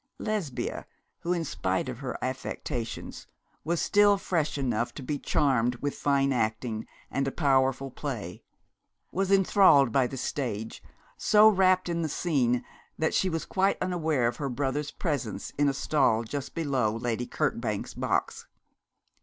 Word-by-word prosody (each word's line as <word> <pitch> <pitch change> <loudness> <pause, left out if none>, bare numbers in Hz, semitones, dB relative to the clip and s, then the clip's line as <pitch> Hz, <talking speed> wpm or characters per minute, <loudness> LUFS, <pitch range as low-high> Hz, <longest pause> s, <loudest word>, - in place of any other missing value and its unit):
Lesbia, 205 - -3 0.3
who, 175 - -3
in 170 -2 0
spite 95 -7 -1
of 125 -1 -5
her 135 -2 -4
affectations, 125 -2 -5 0.4
was 170 +2 0
still 205 0 +4
fresh 165 -6 -1
enough 120 -4 -1
to 140 - -7
be 145 +2 -3
charmed 125 -4 +1
with 145 +3 -3
fine 140 -1 +1
acting 110 -1 -2 0.2
and 135 +1 0
a - - -1
powerful 135 -2 +1
play, 115 - -5 0.7
was 195 +2 -1
enthralled 190 - +5
by 130 +1 +3
the 135 - -7
stage, 115 -5 -3 0.4
so 215 0 +6
wrapt 185 -3 +4
in 170 -1 -1
the 160 - -1
scene 125 -7 +1 0.3
that 160 - 0
she 190 - +2
was 165 -2 -3
quite 195 +1 +1
unaware 160 -8 0
of 120 - -2
her 140 -2 -2
brother's 140 +3 -2
presence 125 - -3
in 145 0 +2
a - - +2
stall 135 -5 +2
just 140 +4 -5
below 135 -9 0
Lady 120 +1 -2
Kirkbank's 115 -8 -2
box. - - -2
140 Hz, 150 wpm, -28 LUFS, 120-165 Hz, 0.7 s, so